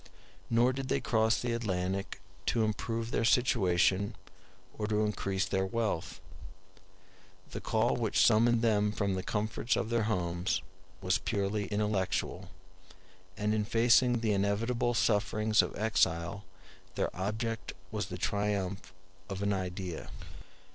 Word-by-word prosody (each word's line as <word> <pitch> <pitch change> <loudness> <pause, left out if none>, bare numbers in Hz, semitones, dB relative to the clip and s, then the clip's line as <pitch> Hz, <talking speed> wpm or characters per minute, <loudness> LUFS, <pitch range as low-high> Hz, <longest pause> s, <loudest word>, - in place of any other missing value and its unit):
Nor 120 +2 +3
did 135 0 -4
they - - +1
cross 110 -1 +2
the 120 -1 -1
Atlantic 95 -4 -2 0.3
to 115 - +2
improve 115 +2 -2
their - - 0
situation 100 -4 +2 0.6
or 105 - -3
to 105 0 +1
increase 100 -2 -1
their 95 -1 0
wealth; 105 -3 -2 1.3
the - - -5
call - - +1
which - - 0
summoned 115 +2 +4
them 105 -2 +3
from 100 -2 -1
the 95 - -2
comforts 110 +4 -1
of 115 - -2
their 115 -2 +2
homes 90 -2 -1 0.4
was 95 +3 +1
purely 100 +1 -1
intellectual; 105 -3 -1 0.9
and 105 +1 0
in 110 -1 +1
facing 120 +2 +4
the 110 -2 +1
inevitable 115 +5 0
sufferings 110 0 +2
of - - -5
exile 100 -3 0 0.5
their - - -1
object 110 +4 -3 0.2
was - - -2
the - - -6
triumph 100 -2 -2 0.4
of 95 0 -4
an 100 0 +1
idea. 90 -2 -4
105 Hz, 130 wpm, -31 LUFS, 95-115 Hz, 1.3 s, summoned